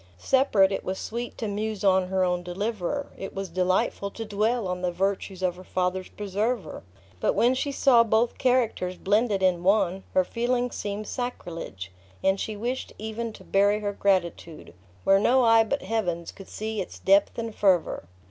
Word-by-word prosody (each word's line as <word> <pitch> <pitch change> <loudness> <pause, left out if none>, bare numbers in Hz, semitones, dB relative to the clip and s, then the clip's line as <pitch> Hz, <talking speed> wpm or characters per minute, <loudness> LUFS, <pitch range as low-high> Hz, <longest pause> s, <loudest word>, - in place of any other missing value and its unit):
Separate, 205 - +3
it 195 - -2
was 190 +1 -3
sweet 235 +2 -5
to 225 - -3
muse 210 0 -3
on 190 -2 +4
her 190 0 +1
own 180 -1 0
deliverer; 205 +8 -3
it 195 - -6
was 195 -1 -4
delightful 185 +3 0
to 225 +3 -7
dwell 215 +1 0
on 180 0 -3
the 180 -1 0
virtues 190 +1 -2
of 180 -1 0
her 185 - -11
father's 185 0 -2
preserver. 210 -1 -3 0.4
But - - +1
when 245 +2 +4
she 275 +2 -1
saw 260 -4 +5
both 230 +1 +1
characters 235 -8 +1
blended 205 -1 +1
in 180 -2 +3
one, 190 0 +2
her 185 - +5
feelings 245 +4 -1
seemed 205 +1 -4
sacrilege; 170 - -5 0.3
and 190 0 +2
she 215 -1 -4
wished 245 +5 -3
even 220 +2 -4
to - - -13
bury 205 +2 +2
her 205 -1 -2
gratitude, 175 - -1 0.3
where 195 0 +5
no 255 +5 +4
eye 225 -1 +6
but 280 +6 -2
Heaven's 180 -5 -2
could 195 - -13
see 215 -1 -3
its 185 - -7
depth 195 +1 +3
and 230 -1 -4
fervor. 185 - +1
200 Hz, 175 wpm, -26 LUFS, 185-225 Hz, 0.4 s, eye